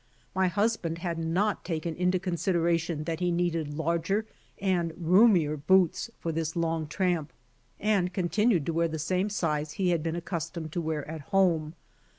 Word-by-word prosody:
My 190 0 +2
husband 185 -3 0
had 170 -1 -3
not 180 +6 0
taken 165 -1 -3
into 180 +2 +2
consideration 170 -3 0
that 165 0 -3
he 180 -1 +1
needed 165 -4 -1
larger 170 +6 0 0.3
and 180 -4 0
roomier 175 -3 +4
boots 185 +7 +3
for 165 - -3
this 160 0 -2
long 165 -2 -1
tramp 160 -1 -1 0.5
and 200 -4 +1
continued 185 - +1
to 165 - -1
wear 165 +1 +2
the 160 -1 -4
same 185 +6 0
size 155 -6 -1
he 185 +2 0
had 170 -2 +1
been 165 +1 -2
accustomed 170 -2 -4
to 175 - -2
wear 155 -3 -3
at 160 0 -6
home. 170 -5 +2
170 Hz, 160 wpm, -28 LUFS, 160-185 Hz, 0.5 s, roomier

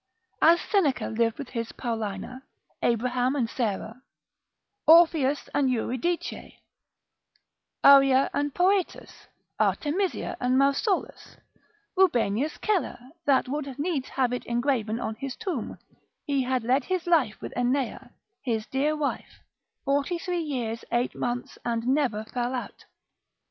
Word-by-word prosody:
As 335 +2 +6
Seneca 350 -11 +1
lived 230 0 0
with 280 -3 -7
his 230 -2 -4
Paulina, 225 +1 -4 0.4
Abraham 250 +3 +1
and 250 -5 0
Sarah, 225 +1 -3 0.9
Orpheus 315 -4 +5
and 275 -2 +2
Eurydice, 255 +8 -2 1.3
Arria 275 -1 +7
and 290 0 0
Poetus, 370 +3 0 0.3
Artemisia 360 +6 0
and 250 +1 +2
Mausolus, 280 +9 0 0.6
Rubenius 285 - +2
Celer, 420 -4 0 0.3
that 275 -3 +3
would 275 -1 -4
needs 290 -3 -2
have 255 -2 0
it 250 - -4
engraven 235 -2 0
on 220 - -3
his 260 +4 -6
tomb, 360 - -4 0.5
he 280 -2 +1
had 255 -1 -1
led 255 +4 +1
his 370 -2 -2
life 315 -11 +2
with - - -7
Ennea, 250 +1 -1 0.3
his 225 -4 -2
dear 290 +3 0
wife, 295 -2 -4 0.4
forty 285 +5 +1
three 350 0 -2
years 245 -7 -3
eight 240 +1 0
months, 245 0 -4
and 230 -1 -2
never 255 -5 +1
fell 245 +3 -2
out. 250 - -7
265 Hz, 125 wpm, -26 LUFS, 240-300 Hz, 1.3 s, Arria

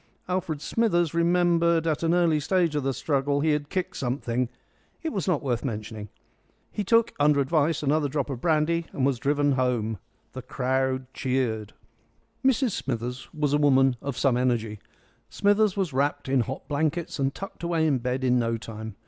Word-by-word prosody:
Alfred 175 -5 -2
Smithers 175 -7 +1
remembered 170 -1 +3
at 155 -2 0
an 165 +1 +2
early 170 -3 +3
stage 170 0 +1
of 145 - +1
the 135 0 0
struggle 140 +2 0
he 155 +1 +2
had 150 -1 -1
kicked 185 -2 -3
something; 125 -1 -2 0.5
it 320 - -2
was 195 - -2
not 175 -6 +1
worth 120 -4 -1
mentioning. 110 -4 -5 0.6
He 210 - -2
took, 230 +3 +3
under 145 0 +4
advice, 155 +3 +1
another 145 0 +1
drop 145 0 -1
of 130 - -3
the - - -22
brandy, 165 +1 +1
and 130 - 0
was 135 -3 +1
driven 145 +2 +1
home. 120 -5 0 0.3
The 130 - -6
crowd 130 +1 -1
cheered. 125 -5 -1 0.7
Mrs 265 -2 +3
Smithers 125 -3 -4
was 150 -2 -1
a 145 - +3
woman 135 -3 +4
of 140 -3 -4
some 130 -3 +2
energy. 115 -4 0 0.5
Smithers 205 0 +2
was 185 -7 -1
wrapped 145 +2 0
in 135 0 +2
hot 130 +3 -3
blankets 155 +2 -1
and 135 0 +1
tucked 195 +7 -9
away 170 -2 +1
in 140 -5 +2
bed 125 +2 -2
in 125 -1 +3
no 115 -1 0
time. 110 -1 -8
145 Hz, 180 wpm, -26 LUFS, 130-165 Hz, 0.7 s, under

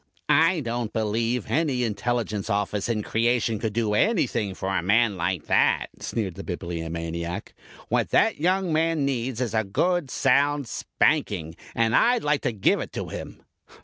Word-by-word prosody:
"I 165 +1 +3
don't 120 -3 -3
believe 115 +2 -1
any 130 0 +1
Intelligence 110 -2 -2
Office 100 +1 -1
in 110 -2 0
creation 115 -1 +1
could 110 -1 -2
do 110 -2 0
anything 115 - +1
for 95 +1 -2
a - - +1
man 105 +3 +3
like 90 -1 -2
that," - - +2
sneered 100 -6 -3
the - - -8
Bibliomaniac. 85 +2 -4 0.3
"What - - 0
that - - +3
young 185 +1 +1
man 160 -2 +1
needs 130 -3 -2
is 120 -4 -2
a 110 -1 +2
good 170 - 0
sound 140 +1 +2
spanking, 80 -6 0 0.2
and 115 -1 +2
I'd 240 0 +4
like 150 -1 +1
to - - 0
give 105 -4 +2
it - - -5
to - - -4
him." - - -8
115 Hz, 160 wpm, -25 LUFS, 100-140 Hz, 0.3 s, I'd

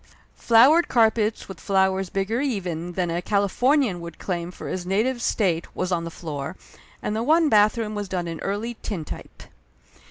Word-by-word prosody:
Flowered 270 +9 +5
carpets 220 -2 +2
with 190 -3 -9
flowers 190 -1 +1
bigger 195 +7 -1
even 180 - -3
than 175 -1 -1
a 170 +1 -1
Calif 200 0 -1
ornian 255 - +3
could 170 0 -8
claim 175 -2 -3
for 180 - -9
his 185 - -3
native 220 +7 0
state 180 -8 0
was 185 0 -2
on 170 -2 0
the - - -4
floor, 155 -1 -6 0.5
and 210 - -2
the 220 - -1
one 315 +5 +3
bathroom 215 0 +3
was 205 -2 -4
done 180 -2 -2
in 165 -1 -5
Early 210 +5 -3
Tintype. 170 -8 -7
195 Hz, 170 wpm, -24 LUFS, 175-225 Hz, 0.5 s, Flowered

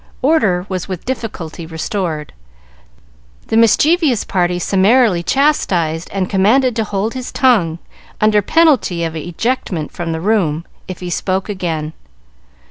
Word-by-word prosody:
Order 215 - +2
was 185 -3 -4
with 185 -3 -6
difficulty 185 -10 -5
restored, 160 -2 -4 1.2
the - - 0
mischievous 265 - +3
party 180 -1 0
summarily 195 +2 +3
chastised 175 - 0
and 190 -2 -1
commanded 225 +7 +2
to 225 - +1
hold 210 +1 -2
his 255 -1 -6
tongue, 200 -12 +2 0.4
under 210 -1 +3
penalty 255 - +2
of 165 -1 -3
ejectment 175 - -3
from 170 -1 -4
the 160 - -3
room 170 -5 0 0.2
if 185 -1 -7
he 180 -1 -5
spoke 190 +3 -1
again. 165 -6 -3
190 Hz, 125 wpm, -17 LUFS, 170-230 Hz, 1.2 s, mischievous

